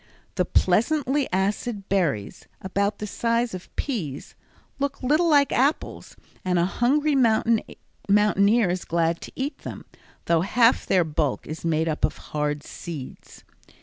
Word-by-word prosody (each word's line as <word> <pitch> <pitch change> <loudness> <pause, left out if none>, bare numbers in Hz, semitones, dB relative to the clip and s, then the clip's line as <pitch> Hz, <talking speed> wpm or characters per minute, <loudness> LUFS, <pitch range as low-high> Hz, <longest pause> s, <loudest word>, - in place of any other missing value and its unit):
The 180 -1 0
pleasantly 270 - +1
acid 200 +2 -1
berries, 160 - -1
about 200 +2 -1
the 210 - -5
size 230 +2 -1
of 185 -1 -8
peas, 170 - -4 0.5
look 280 -1 -3
like 255 - 0
little 330 +2 +3
apples, 280 0 +1 0.3
and 180 -1 +1
a 170 - +3
hungry 285 +9 +1
mountaineer 220 -3 +2
is 180 0 -3
glad 170 0 0
to - - -9
eat 275 +3 -4
them, - - -8 0.4
though 165 -1 +3
half 230 +6 +3
their 185 -2 +3
bulk 155 -3 -2
is 155 - -7
made 160 -1 +1
up 155 -1 -3
of - - +1
hard 150 -1 -3
seeds. 155 -7 -9
200 Hz, 140 wpm, -24 LUFS, 170-245 Hz, 0.5 s, little